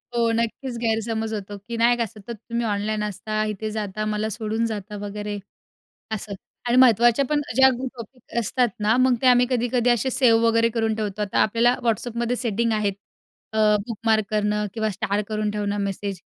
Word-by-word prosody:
हो, 230 -1 +2
नक्कीच 235 +3 -2
गैरसमज 225 -1 -1
होतो, 205 -1 -5
की 230 +4 -7
नाही 235 +1 +4
का 235 - +1
सतत 215 +2 -9
तुम्ही 235 0 -1
ऑनलाईन 210 0 -1
असता, 215 +1 -2
इथे 215 +1 -4
जाता, 210 0 -3
मला 215 0 -1
सोडून 220 +1 -2
जाता 210 -2 -5
वगैरे 205 0 -4 0.8
असं 210 -1 -6 0.4
आणि 240 - +3
महत्त्वाच्या 240 +1 +5
पण 295 +2 0 0.2
ज्या 265 0 +7
ग्रू 260 +2 -4
टॉपिक 235 0 -11
असतात 240 +2 +1
ना 215 +2 +3
मग 260 -1 +4
ते - - +2
आम्ही 250 0 +6
कधी-कधी 245 0 +1
असे 240 +2 +1
सेव 235 -3 +4
वगैरे 230 0 +3
करून 225 -1 +1
ठेवतो. 210 -1 -3
आता 205 - -1
आपल्याला 235 +3 +3
WhatsAppमध्ये 235 +1 -1
सेटिंग 230 -1 0
आहेत. 210 -2 +1 0.6
अ, 220 - -2 0.3
बुकमार्क 225 -1 +1
करणं 210 0 0
किंवा 220 -1 0
स्टार 200 +1 -1
करून 215 -1 -1
ठेवणं 205 -1 -2
मेसेज, 195 -1 -4
220 Hz, 175 wpm, -23 LUFS, 210-235 Hz, 0.8 s, ज्या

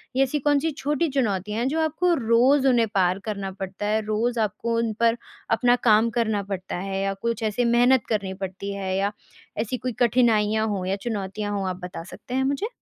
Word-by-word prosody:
या 270 - +4
ऐसी 290 +3 -1
कौन 290 +1 +2
सी 320 +2 -1
छोटी 295 +2 -1
चुनौतियाँ 210 -5 -1
हैं 245 - 0
जो 315 +4 -1
आपको 330 +3 +1
रोज़ 260 +4 +4
उन्हें 235 -3 +4
पार 185 0 +2
करना 200 -3 -3
पड़ता 190 +1 -6
है? 215 +1 +1
रोज़ 230 +3 0
आपको 220 +2 -1
उन 230 -2 0
पर 230 0 +3 0.3
अपना 245 +2 +4
काम 225 0 +5
करना 215 -3 +1
पड़ता 190 -1 -5
है 195 +1 -3
या 195 0 0
कुछ 230 +3 -3
ऐसे 220 +3 0
मेहनत 240 +1 +4
करनी 200 -4 -1
पड़ती 190 +1 -5
है 190 -1 -3
या 200 +1 0 0.5
ऐसी 250 +3 -3
कोई 250 -1 -4
कठिनाइयाँ 220 -3 +3
हों 195 -3 -2
या 190 +1 0
चुनौतियाँ 205 -1 -4
हों 195 -1 -2
आप 180 - -3
बता 175 -2 -6
सकते 245 +7 -10
हैं 265 0 +1
मुझे? 280 +10 -1
220 Hz, 205 wpm, -24 LUFS, 195-245 Hz, 0.5 s, काम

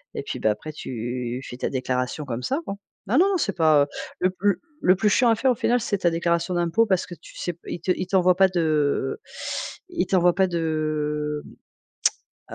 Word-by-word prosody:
et - - -3
puis, - - -5
bah, 110 - +3
après, 110 +9 -5
tu 125 -2 -4
fais 125 - -7
ta - - -2
déclaration 130 +2 -2
comme 125 -2 -4
ça, 275 - 0
quoi. 195 - -4 0.3
Ah 250 - +3
non, 375 +4 +6
non, 390 - +2
c'est 200 - 0
pas, 155 -4 +5
heu, - - -16 0.3
le 185 - +3
plus 205 +3 +3
l - - -4 0.2
le 185 +1 +5
plus 210 +3 +2
chiant 240 +4 +4
à 225 - +5
faire 260 +3 +2
au - - +1
final, 245 +2 +2
c'est 205 -4 -1
ta 175 - +3
déclaration 170 +1 0
d'impôt 175 +6 +2
parce 190 -3 +1
que 175 - -8
tu - - -16
sais 175 - -2
p 170 - -29
ils - - -4
te 185 - -6
ils - - -3
t'envoient 180 -1 +4
pas 190 +1 +6
de 160 - +1 0.7
ils 355 -2 -1
t'envoient 180 -3 +3
pas 190 0 +4
de, 155 -3 -1 1.1
mmh, - - -6
170 Hz, 225 wpm, -24 LUFS, 150-195 Hz, 1.1 s, non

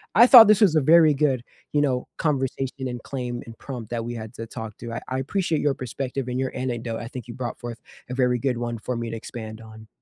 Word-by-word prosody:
I 235 +3 +8
thought 235 -5 +11
this 215 -1 +5
was 190 -7 +5
a 155 - +4
very 160 +1 +6
good, 135 -4 +1 0.3
you 150 - +2
know, 130 -3 0
conversation 135 -2 -1
and 120 -1 -6
claim 125 -3 -4
and 115 0 -11
prompt 120 -6 -7
that 115 -1 -2
we 120 +1 -5
had 110 0 -7
to 115 - -6
talk 110 -1 -7
to. 115 0 -7
I - - -4
I 130 +1 -2
appreciate 165 +3 -1
your 145 -2 +2
perspective 130 +1 -4
and 125 0 -2
your 130 -1 -1
anecdote, 120 -3 -3
I 115 - -6
think 125 -1 -8
you - - -5
brought 120 0 -5
forth 120 -1 -7 0.3
a - - -4
very 125 -1 +2
good 125 -1 -1
one 120 -1 -3
for 125 +2 -3
me 115 -1 -3
to 115 - -4
expand 110 -1 -8
on. 110 0 -13
125 Hz, 250 wpm, -24 LUFS, 115-135 Hz, 0.3 s, thought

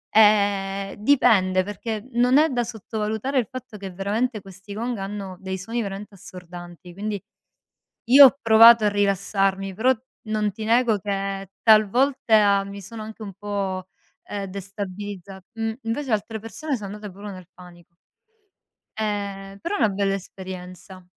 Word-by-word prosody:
Ehm, 200 -2 +3
dipende 205 -7 +3
perché 210 +2 -5
non 250 +3 +4
è 315 +2 +5
da 245 -2 0
sottovalutare 220 +3 -2
il 230 - -1
fatto 245 -4 -8
che 195 -1 -7
veramente 210 +4 -2
questi 195 +1 -11
gong 235 +2 -2
hanno 195 -1 -6
dei 190 0 -4
suoni 230 +5 -3
veramente 200 0 -6
assordanti, 175 -1 -11
quindi 205 +1 -4 0.9
io 275 +2 +11
ho 275 - -2
provato 225 0 +8
a - - +4
rilassarmi, 195 -1 0
però 250 +6 +3 0.3
non 215 -1 0
ti 215 +3 -7
nego 230 -2 +3
che 195 -1 -3
talvolta 215 -2 +4
mi 200 0 -8
sono 215 +3 -8
anche 220 +1 -10
un 200 - -6
po', 195 -2 -4 0.4
ehm, 200 -1 -5
destabilizza 195 0 -7
mhmm, 225 -1 -2
invece 245 +3 -3
altre 220 +1 -1
persone 275 +6 -4
sono 205 -1 -7
andate 210 -2 -8
pure 205 +1 -8
nel 185 -2 -11
panic 175 -2 -15 1.1
Ehm, 200 -2 -3
però 405 +5 -3
è - - -1
una 215 - +4
bella 195 0 0
esperienza. 185 -1 -8
205 Hz, 145 wpm, -23 LUFS, 195-220 Hz, 1.1 s, io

